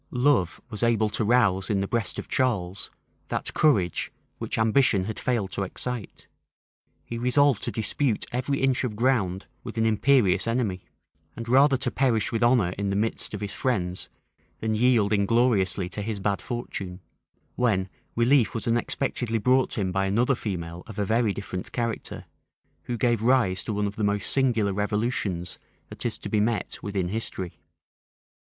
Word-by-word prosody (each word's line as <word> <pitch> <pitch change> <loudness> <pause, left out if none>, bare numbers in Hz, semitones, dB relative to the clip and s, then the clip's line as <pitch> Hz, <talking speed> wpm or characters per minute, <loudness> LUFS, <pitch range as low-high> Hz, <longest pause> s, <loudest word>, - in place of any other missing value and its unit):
Love 125 - +2
was 105 - -4
able 115 -2 +2
to 110 - -1
rouse 105 -5 +3
in 100 -3 +1
the 95 - -1
breast 115 -4 -2
of - - -5
Charles 100 -8 -1 0.4
that - - -3
courage 100 - +2 0.3
which - - -3
ambition 110 -2 +3
had 110 +3 -5
failed 115 -7 -1
to - - -3
excite: 115 +4 -5 0.8
he 115 - -5
resolved 125 0 +3
to - - -2
dispute 115 +2 0
every 130 +3 -1
inch 135 -1 +2
of 120 -5 -2
ground 105 -6 +1 0.2
with - - -7
an 110 - +2
imperious 115 -2 +3
enemy, 115 -6 -1 0.5
and 115 0 -6
rather 135 +3 +5
to 130 - -2
perish 115 -6 +1
with 115 - -1
honor 120 -7 +4
in 100 -1 -1
the 100 - 0
midst 110 +1 -1
of 105 - -6
his 100 -1 -4
friends, 95 -8 -2 0.5
than 110 0 -1
yield 110 -2 +3
ingloriously 100 -3 +2
to 105 - -5
his 105 0 -3
bad 100 0 -1
fortune; 95 -6 -5 0.6
when 100 -7 +1 0.3
relief 120 +1 +3
was 115 - -3
unexpectedly 120 0 0
brought 125 +4 +2
him 95 -3 0
by 95 +1 0
another 120 +7 +2
female 85 -7 -4
of 110 - -10
a 105 - 0
very 110 +1 +2
different 95 -2 -6
character, 115 -2 -3 0.6
who 120 - -3
gave 120 -2 +1
rise 115 -7 +3
to 110 - -4
one 105 0 0
of 100 0 -4
the 110 - -1
most 100 -1 +1
singular 115 -7 +2
revolutions 105 -4 -2 0.3
that - - -8
is - - -4
to - - -7
be 105 - +1
met 110 +1 -1
with 100 0 -6
in 90 -2 0
history. 95 -4 -5
110 Hz, 170 wpm, -26 LUFS, 100-125 Hz, 0.8 s, rather